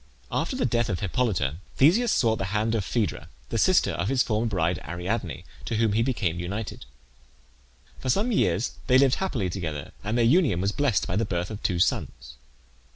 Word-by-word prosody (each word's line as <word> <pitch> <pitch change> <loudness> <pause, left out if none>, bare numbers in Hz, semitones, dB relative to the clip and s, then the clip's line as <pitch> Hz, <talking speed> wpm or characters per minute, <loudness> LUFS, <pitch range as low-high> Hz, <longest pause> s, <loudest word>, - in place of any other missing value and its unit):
After 165 - -1
the 255 - 0
death 120 -3 +1
of 90 -5 -2
Hippolyte 95 - 0 0.2
Theseus 215 - +4
sought 110 -2 +2
the 95 - -1
hand 110 +2 0
of 110 -3 0
Phaedra, 100 -8 -2 0.2
the 115 - -1
sister 185 - +4
of - - -2
his 130 -1 +3
former 110 +1 0
bride 90 -4 0
Ariadne, 90 +3 -4 0.2
to 115 - -2
whom 110 -1 +2
he 110 - +2
became 105 -9 -1
united. 100 +5 -5 1.1
For 130 - -4
some 210 - +2
years 95 - +1 0.2
they 130 0 +6
lived 135 -1 +4
happily 135 - -1
together, 80 -5 -5
and 105 +4 -1
their 120 - +3
union 135 - +3
was 100 +2 +1
blessed 135 -5 +1
by 90 - -2
the 115 - +2
birth 90 0 -3
of 105 - -6
two 90 - 0
sons. 65 -7 -1
110 Hz, 190 wpm, -26 LUFS, 90-125 Hz, 1.1 s, they